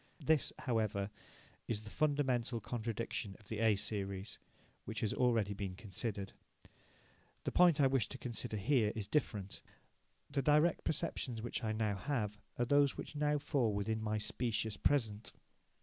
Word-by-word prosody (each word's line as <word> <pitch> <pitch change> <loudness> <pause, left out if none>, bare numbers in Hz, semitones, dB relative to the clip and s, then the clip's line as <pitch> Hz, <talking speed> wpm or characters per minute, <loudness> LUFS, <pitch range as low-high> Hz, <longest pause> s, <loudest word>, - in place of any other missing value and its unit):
This, 155 -2 +3
however, 110 -5 0 0.6
is 110 -2 -1
the 105 -1 -9
fundamental 135 -6 +1
contradiction 115 -3 -3
of 105 - -20
the 110 - -3
A 110 -2 +5
series, 100 0 -3 0.5
which - - -4
has 110 - +1
been - - -2
already 115 -5 +3
considered. 100 +1 -4 1.1
The - - -1
point 175 -4 +6
I 140 - +6
wish 130 -5 +2
to 130 - -6
consider 120 -3 -3
here 110 0 +3
is 105 -3 -3
different. 105 -8 -1 0.7
The 140 -1 0
direct 150 +4 +4
perceptions 120 -6 -1
which 120 +1 -3
I 110 - 0
now 110 -2 0
have 105 -5 -2 0.2
are 120 - +2
those 145 +2 +4
which - - -6
now 150 0 +2
fall 140 -6 +1
within 110 +2 -1
my 110 0 0
"specious 110 0 -1
present". 110 -7 +1
115 Hz, 150 wpm, -36 LUFS, 105-135 Hz, 1.1 s, point